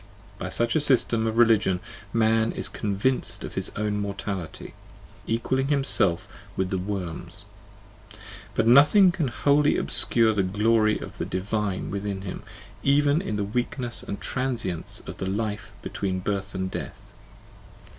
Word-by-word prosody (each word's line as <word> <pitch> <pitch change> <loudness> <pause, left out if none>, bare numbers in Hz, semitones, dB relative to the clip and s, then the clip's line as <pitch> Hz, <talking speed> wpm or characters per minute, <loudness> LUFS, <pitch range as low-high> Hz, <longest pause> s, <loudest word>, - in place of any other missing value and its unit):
By 95 - -4
such 115 +5 +1
a - - +4
system 120 -5 +3
of 110 0 -2
religion 110 -6 +4 0.3
man 115 0 +2
is - - -3
convinced 105 +5 -1
of - - -6
his - - -2
own 105 0 -1
mortality, 100 -4 -5 0.5
equalling 130 +4 0
himself 135 - +2 0.3
with 95 -1 -1
the 95 - 0
worms: 95 +1 -5 1.1
but - - +2
nothing 150 - +7
can 170 -5 -1
wholly 145 +4 +3
obscure 115 -2 +2
the 105 - +1
glory 110 +3 +2
of - - -9
the - - -1
divine 100 +1 -2
within 100 -1 -3
him, 95 - -6 0.4
even 145 +3 +3
in 105 - -3
the 105 - -1
weakness 120 +3 -3
and 100 - -6
transience 120 -10 -2
of - - -8
the 95 - -3
life 105 0 -3
between 95 -2 -2
birth 100 +1 -3
and 95 0 -2
death. - - -7
105 Hz, 145 wpm, -25 LUFS, 100-120 Hz, 1.1 s, nothing